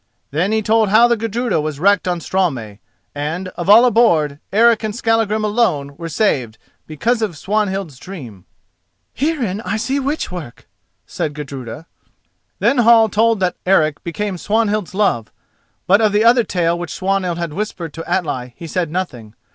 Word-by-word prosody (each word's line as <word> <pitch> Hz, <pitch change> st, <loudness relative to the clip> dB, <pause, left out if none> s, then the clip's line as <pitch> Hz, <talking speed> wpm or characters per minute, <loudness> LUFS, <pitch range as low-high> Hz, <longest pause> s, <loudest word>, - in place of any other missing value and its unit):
Then 170 Hz, +8 st, 0 dB
he 220 Hz, 0 st, +1 dB
told 220 Hz, -1 st, +2 dB
how 225 Hz, +4 st, +6 dB
the 240 Hz, -, +2 dB
Gudruda 225 Hz, -4 st, -1 dB
was 150 Hz, -2 st, -4 dB
wrecked 195 Hz, +1 st, +3 dB
on 175 Hz, -1 st, -1 dB
Straumey, 130 Hz, -, -2 dB, 0.3 s
and, 160 Hz, +6 st, -4 dB
of 175 Hz, 0 st, -5 dB
all 225 Hz, +4 st, +8 dB
aboard, 170 Hz, -, +3 dB
Eric 230 Hz, +2 st, +4 dB
and 215 Hz, -1 st, -3 dB
Skallagrim 225 Hz, -2 st, +1 dB
alone 185 Hz, -11 st, 0 dB
were 165 Hz, +2 st, -7 dB
saved 130 Hz, -, 0 dB, 0.3 s
because 225 Hz, +10 st, -1 dB
of 200 Hz, -8 st, -2 dB
Swanhild's 195 Hz, -7 st, -2 dB
dream. 125 Hz, -, -10 dB, 0.7 s
"Herein 255 Hz, -, -1 dB
I 200 Hz, +3 st, -2 dB
see 270 Hz, +5 st, -1 dB
witch 280 Hz, -2 st, -2 dB
work," 170 Hz, -9 st, -9 dB, 0.4 s
said 150 Hz, -1 st, -4 dB
Gudruda. 140 Hz, -1 st, -7 dB, 0.7 s
Then 275 Hz, -, +2 dB
Hall 230 Hz, -1 st, +6 dB
told 225 Hz, +1 st, +2 dB
that 180 Hz, -1 st, 0 dB
Eric 155 Hz, -6 st, +2 dB
became 185 Hz, +2 st, -4 dB
Swanhild's 210 Hz, -2 st, 0 dB
love, 120 Hz, -, 0 dB, 0.5 s
but 200 Hz, +4 st, +4 dB
of 215 Hz, -2 st, +2 dB
the 210 Hz, +1 st, +3 dB
other 240 Hz, +1 st, +5 dB
tale 170 Hz, -3 st, 0 dB
which 175 Hz, -2 st, -5 dB
Swanhild 185 Hz, -2 st, -1 dB
had 170 Hz, -3 st, -4 dB
whispered 180 Hz, -5 st, -5 dB
to 165 Hz, -, -8 dB
Atli 130 Hz, -9 st, -2 dB
he 170 Hz, -, -8 dB
said 170 Hz, 0 st, -2 dB
nothing. 125 Hz, -, -5 dB
190 Hz, 165 wpm, -18 LUFS, 155-220 Hz, 0.7 s, all